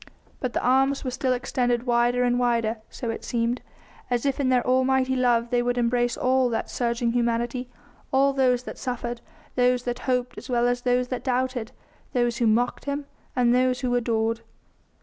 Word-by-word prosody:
But 255 -2 -3
the - - -1
arms 270 +2 +3
were 255 - -2
still 255 +1 -1
extended 245 -1 0
wider 240 0 +2
and 245 0 +2
wider, 235 -2 +1
so 235 -3 -4
it - - -6
seemed, 235 +1 -1 0.5
as 245 +1 0
if 275 0 0
in 270 -2 +1
their 250 -1 +2
almighty 260 +1 +2
love 240 -2 +2
they 245 -1 +3
would 245 0 0
embrace 240 0 +1
all 255 0 +2
that 225 - -3
surging 235 -1 0
humanity; 240 +1 -1 0.4
all 275 +1 +3
those 255 -2 +2
that - - -8
suffered, 240 -2 -4 0.3
those 250 0 +2
that 245 0 -3
hoped 250 -1 0
as - - -12
well 240 -1 +2
as 245 0 0
those 250 0 +1
that 255 - -3
doubted, 255 -2 -1 0.4
those 240 -1 +1
who 235 - +2
mocked 235 +3 +1
Him 285 0 -3 0.3
and 245 -1 +3
those 255 0 +2
who 250 -2 0
adored. 230 -1 0
245 Hz, 185 wpm, -25 LUFS, 240-255 Hz, 0.5 s, arms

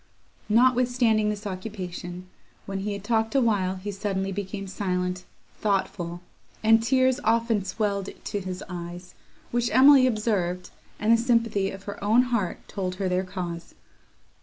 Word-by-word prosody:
Notwithstanding 240 -2 +3
this 210 0 -4
occupation, 185 -2 -6 0.4
when 195 0 -4
he 205 +1 -2
had 200 -1 -6
talked 225 +2 0
awhile 205 -8 +2
he 195 +2 -5
suddenly 195 -1 -2
became 195 0 -4
silent, 180 -1 -2 0.3
thoughtful, 175 -4 -1 0.4
and 225 +1 +6
tears 260 +2 +2
often 230 -2 +2
swelled 200 0 -2 0.2
to 205 - -2
his 185 -1 -5
eyes, 175 0 -7 0.4
which 240 0 +1
Emily 260 +2 +7
observed, 195 -6 -1 0.3
and 220 +2 +4
the - - +6
sympathy 230 -4 +1
of 195 0 -9
her 200 0 -7
own 225 +4 +5
heart 200 -7 -2
told 185 -3 -3
her 190 0 -2
their 180 +1 +1
cause. 180 -3 -6
200 Hz, 140 wpm, -26 LUFS, 185-225 Hz, 0.4 s, Emily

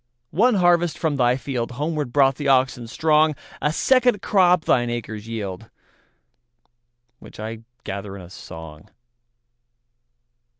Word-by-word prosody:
One 235 +5 +3
harvest 175 -3 +3
from 160 -4 -1
thy 125 -1 +3
fieldHomeward 135 +3 -3
brought 135 0 +4
the 145 - -3
oxen 130 -3 +2
strong;A 155 +2 +1
second 245 +3 +2
crop 180 -4 +3
thine 120 -1 +2
acres 110 -2 -5
yield, 105 -2 -6 1.5
Which - - -14
I 110 +1 -5 0.2
gather 100 0 -6
in 95 - -9
a 85 - -13
song. 80 -1 -11
130 Hz, 115 wpm, -22 LUFS, 110-160 Hz, 1.5 s, brought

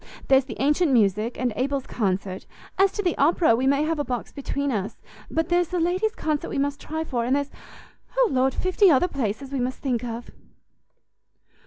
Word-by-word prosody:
There's 265 -1 +5
the 245 - -8
ancient 295 +4 +2
music, 215 0 +2
and 245 -2 0
Abel's 270 +1 -1
concert; 190 -3 -2 0.3
as 390 0 +5
to 410 - -2
the 350 -3 +1
opera, 315 -3 +4
we 255 +3 0
may 280 +2 +3
have 320 0 -1
a - - +1
box 250 -3 -4
between 280 0 -3
us; 205 -4 -3 0.3
but 325 +1 -1
there's 350 0 +2
the 360 - -2
ladies' 370 +6 0
concert 305 -2 -2
we - - -3
must 285 +1 -1
try 315 +1 -3
for; 245 -6 -2
and 250 +3 +1
there's 285 0 -2 0.7
O - - +5
Lord, 260 0 +2
fifty 370 +2 +3
other 305 +3 +4
places 265 - -3
we 275 - -2
must 250 +1 -2
think 250 -4 -2
of!" 235 0 -6
275 Hz, 195 wpm, -24 LUFS, 245-320 Hz, 0.7 s, There's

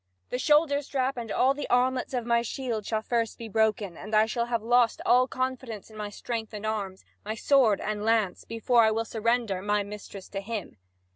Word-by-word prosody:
The 250 - -1
shoulder 295 0 +3
strap 270 -1 -1
and 230 -3 -5
all 265 +2 +3
the 290 - -6
armlets 255 +1 +1
of 245 -2 -2
my 235 0 +3
shield 235 -3 -4
shall 220 -1 -1
first 230 -1 -1
be 230 - -7
broken, 215 -4 0
and 210 +6 -4
I 215 +1 +6
shall 235 +1 -2
have 235 -2 -1
lost 240 0 +3
all 255 +1 +5
confidence 255 -5 -4
in - - -14
my 210 -1 -4
strength 220 +1 -5
and 210 +1 -6
arms, 200 -3 -3 0.2
my 215 +2 -4
sword 235 -4 +3
and 210 -1 -3
lance, 220 -4 +1
before 230 +1 +2
I 220 - +5
will 225 +1 -1
surrender 225 -3 0
my 205 +1 +1
mistress 200 -1 -9
to 195 - -4
him." 210 - -6
225 Hz, 205 wpm, -27 LUFS, 210-245 Hz, 0.2 s, I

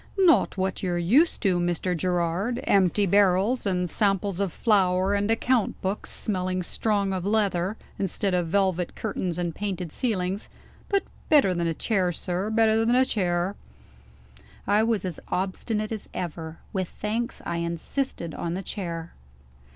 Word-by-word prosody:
"Not 360 - +4
what 190 0 -1
you're 180 -2 -1
used 240 - +3
to, 185 -4 +3
Mr. 175 +1 0
Gerard. 180 +7 0
Empty 195 +1 +3
barrels, 200 +5 +3
and 180 -2 0
samples 195 -1 +1
of 200 -3 0
flour, 190 -3 +2
and 205 +1 0
account 230 0 +1
books 190 +2 -2
smelling 185 -2 -1
strong 200 0 0
of 185 -2 -2
leather, 200 -1 +1 0.2
instead 195 +1 -1
of 175 -2 +1
velvet 185 -1 +1
curtains 185 -5 -3
and 175 -2 -2
painted 185 -4 -4
ceilings; 195 -4 -1 0.4
but 395 -1 +2 0.3
better 275 -12 +5
than 170 -1 -1
a 165 - -1
chair, 190 -3 +1
sir 180 +4 -2
better 220 0 +3
than 235 +2 +3
a 260 +1 +5
chair!" 180 -3 0 1.1
I 205 +2 +3
was 220 -4 +1
as 180 -4 -3
obstinate 210 +4 -2
as 220 -2 -5
ever. 165 -2 -5 0.2
With 185 -3 -1
thanks, 230 +4 -3
I 170 - -2
insisted 170 - -2
on 170 0 -3
the 190 - -4
chair. 170 -4 -5
190 Hz, 150 wpm, -26 LUFS, 175-215 Hz, 1.1 s, better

